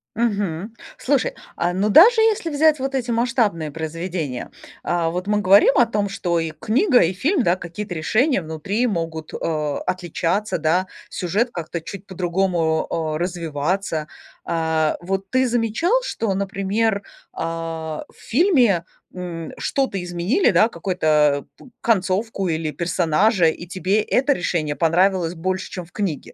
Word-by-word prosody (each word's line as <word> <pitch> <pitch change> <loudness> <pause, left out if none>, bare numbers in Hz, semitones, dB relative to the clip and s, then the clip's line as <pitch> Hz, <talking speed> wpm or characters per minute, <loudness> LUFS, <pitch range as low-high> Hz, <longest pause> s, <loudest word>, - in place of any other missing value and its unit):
Мгм. 205 -3 -1 0.2
Слушай, 275 -1 0 0.2
а, 175 - 0
ну, 195 +3 +1
даже 425 - +7
если 435 -6 +2
взять 305 0 +3
вот 270 +1 -2
эти 245 -2 -1
масштабные 225 - 0
произведения, 165 -3 -4 0.3
а 170 -1 0
вот 180 +3 -4
мы 210 0 +2
говорим 200 +7 +5
о 245 - +6
том, 210 -3 -1
что 175 -3 -1
и 165 -1 -2
книга, 245 - +2
и 170 +2 +2
фильм, 280 - +1
да, 175 -2 +3
какие-то 180 +2 -6
решения 220 - +2
внутри 165 +9 -2
могут, 165 -6 -3
а, 150 -3 -2
отличаться, 185 +3 -1
да, 170 +4 +1 0.2
сюжет 210 +7 -1
как-то 170 0 -4
чуть 195 +4 -9
по-другому, 175 -3 0 0.3
а, - - -1
развиваться. 170 -1 -2 0.4
А, 160 -2 0
вот 195 +2 -3
ты 260 +3 +2
замечал, 240 - 0
что, 225 - -2
например, 200 +2 -1 0.3
а 165 -1 -4
в - - -25
фильме, 250 - +3 0.3
м, 175 -3 -6
что-то 265 -9 -1
изменили, 180 - +1
да, 220 - +5
какой-то, 155 -7 +1
п - - -16
концовку 195 -1 0
или 160 -1 -1
персонажа, 175 +4 +2
и 160 +2 0
тебе 185 +4 0
это 270 +6 +2
решение 165 - -1
понравилось 175 +1 +2
больше, 185 +3 -3
чем 180 -2 -6
в 170 - -22
книге? 190 -9 -3
185 Hz, 145 wpm, -21 LUFS, 165-220 Hz, 0.4 s, даже